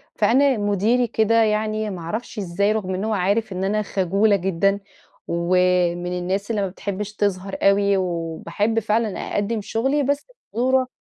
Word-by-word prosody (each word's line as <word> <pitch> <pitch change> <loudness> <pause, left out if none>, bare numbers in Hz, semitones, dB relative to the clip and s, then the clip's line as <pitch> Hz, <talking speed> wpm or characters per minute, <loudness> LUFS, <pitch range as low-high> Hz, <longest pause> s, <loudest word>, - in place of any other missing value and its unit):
فأنا 270 +1 +3
مديري 210 +4 +1
كده 225 +1 +3
يعني 215 0 0
ما 185 -3 -6
أعرفش 215 +6 -5
أزاي، 200 +2 0
رغم 195 -4 -2
إن 190 - -3
هو 220 - 0
عارف 200 +3 0
إن 185 +1 -3
أنا 210 +2 +1
خجولة 200 +2 +2
جدًا 195 +2 +1 0.5
ومن 180 0 +1
الناس 195 +5 -2
اللي 210 - 0
ما 195 - 0
بتحبش 200 +2 -5
تظهر 195 -2 -2
أوي، 200 0 +4
وباحب 180 +5 -1
فعلًا 220 -1 0
أقدّم 210 +2 -2
شغلي 265 +8 0
بس 285 - -1 0.3
بصورة 255 +2 +2
205 Hz, 155 wpm, -22 LUFS, 185-220 Hz, 0.5 s, أوي